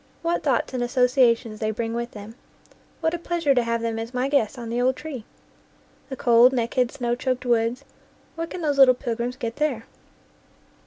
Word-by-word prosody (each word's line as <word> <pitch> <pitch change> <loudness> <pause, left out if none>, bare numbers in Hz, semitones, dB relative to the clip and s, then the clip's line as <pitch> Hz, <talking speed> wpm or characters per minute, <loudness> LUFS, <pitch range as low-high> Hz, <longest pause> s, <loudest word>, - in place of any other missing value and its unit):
What 340 +1 0
thoughts 265 -3 0
and 250 - -2
associa 250 -1 +3
tions 220 -3 -10
they 215 - -1
bring 225 +1 -3
with 235 +1 -3
them! 210 0 -10 0.7
What 320 0 +1
a 345 - -2
pleasure 340 -4 +1
to 250 - +3
have 230 0 -2
them 225 -1 -2
as 230 +3 -6
my 255 +2 0
guests 275 -4 +1
on 235 -2 -6
the 240 +1 0
old 255 +1 +2
tree! 275 -7 -7 0.8
The 265 - -4
cold, 240 +1 +5
naked, 245 0 0
snow 240 -2 -2
choked 255 +1 -2
woods 240 +2 0 0.5
what 330 0 -5
can 360 - -6
those 290 -3 0
little 255 -2 +8
pilgrims 240 -1 -3
get 235 -1 -5
there? 285 -7 -1
245 Hz, 195 wpm, -24 LUFS, 230-275 Hz, 0.8 s, little